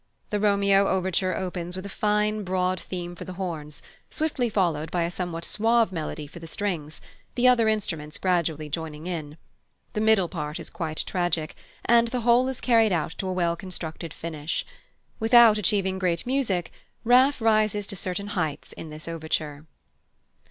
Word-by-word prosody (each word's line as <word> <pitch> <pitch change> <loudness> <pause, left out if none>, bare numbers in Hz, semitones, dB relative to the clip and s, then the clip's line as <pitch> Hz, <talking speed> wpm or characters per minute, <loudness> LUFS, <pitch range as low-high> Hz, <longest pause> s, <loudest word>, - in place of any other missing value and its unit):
The 210 - +1
Romeo 200 -1 +4
overture 185 0 0
opens 180 -1 -4
with 185 +1 -6
a 200 - -7
fine 210 0 +1
broad 185 -1 0
theme 175 -2 -6
for - - -8
the 185 - -7
horns, 160 -6 -5 0.3
swiftly 295 -6 -1
followed 170 -7 0
by 175 -1 0
a 170 - -2
somewhat 175 -2 -4
suave 225 0 +2
melody 155 -3 -4
for 145 +4 -11
the 165 - -9
strings, 165 -5 -4 0.3
the 250 0 +4
other 240 -3 +5
instruments 165 -8 -2
gradually 170 -5 0
joining 155 0 -5
in. 155 -4 -5 0.6
The 215 - -1
middle 220 -4 +4
part 150 -4 -4
is - - -8
quite 155 -2 -3
tragic, 175 -4 -1 0.3
and 235 0 +5
the 245 +1 -2
whole 240 +2 +4
is 265 -1 -4
carried 225 -3 +4
out 165 -3 0
to 190 - -2
a 185 - -1
well 170 -2 +1
constructed 165 -3 -6
finish. 160 -1 -4 0.5
Without 225 -1 +7
achieving 190 -1 +1
great 175 -3 0
music, 245 -10 0 0.3
Raff 255 +4 +5
rises 215 -2 +2
to 200 - -5
certain 185 +2 -4
heights 160 -8 -3
in 160 - -8
this 155 +1 -9
overture. 155 -2 -3
185 Hz, 165 wpm, -26 LUFS, 165-215 Hz, 0.6 s, Without